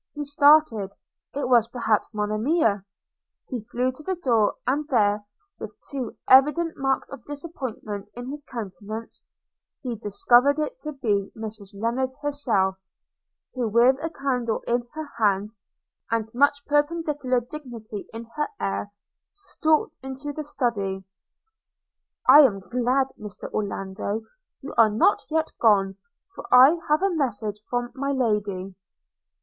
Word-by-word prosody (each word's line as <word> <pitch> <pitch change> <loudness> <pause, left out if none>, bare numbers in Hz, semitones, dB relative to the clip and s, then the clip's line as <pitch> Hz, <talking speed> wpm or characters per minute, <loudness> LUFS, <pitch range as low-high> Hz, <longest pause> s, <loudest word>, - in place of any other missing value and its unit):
He 295 - -3
started. 285 -8 +4 0.4
It 285 - -1
was 240 -3 +4
perhaps 230 -3 0
Monimia! 215 - +1 0.7
He 250 -4 -3
flew 250 +2 0
to 255 - -10
the 375 +5 -2
door; 235 - +2
and 285 +4 0
there, 210 -6 +2 0.4
with - - -8
too 265 -4 -4
evident 300 +6 +5
marks 270 -1 -1
of 275 -4 -9
disappointment 260 -9 -6
in 245 +2 -6
his 295 0 -6
countenance, 220 -1 -7 0.6
he 245 -3 -3
discovered 240 +6 +3
it 305 -1 -3
to 305 -1 -4
be 210 -8 -1
Mrs 215 -3 -7
Lennard 240 +4 0
herself, 230 -10 0 0.8
who 250 -3 -1
with 235 +4 +5
a 325 - -2
candle 250 -7 -2
in 240 0 0
her 315 0 -4
hand, 205 -1 +2 0.6
and 225 -1 -1
much 285 +3 +2
perpendicular 295 -3 +1
dignity 240 -6 -8
in 225 +1 -7
her 300 - +1
air, 200 +1 -2 0.4
stalked 340 -6 0
into 265 +2 -6
the 305 - -5
Study 205 -9 -2 0.6
– - - -35
'I 295 - +10
am 245 -10 +6
glad, 250 +6 0
Mr. 210 -1 -8
Orlando, 200 +1 -3 0.4
you 280 - -7
are 225 -1 +7
not 220 - +3
yet 320 0 0
gone, 195 -4 +3 0.4
for - - -10
I 265 +7 +8
have 305 +5 +3
a 390 -2 +2
message 220 -8 -2
from 245 0 -2
my 275 0 -2
Lady.' 205 -6 -1
245 Hz, 135 wpm, -25 LUFS, 215-285 Hz, 0.8 s, I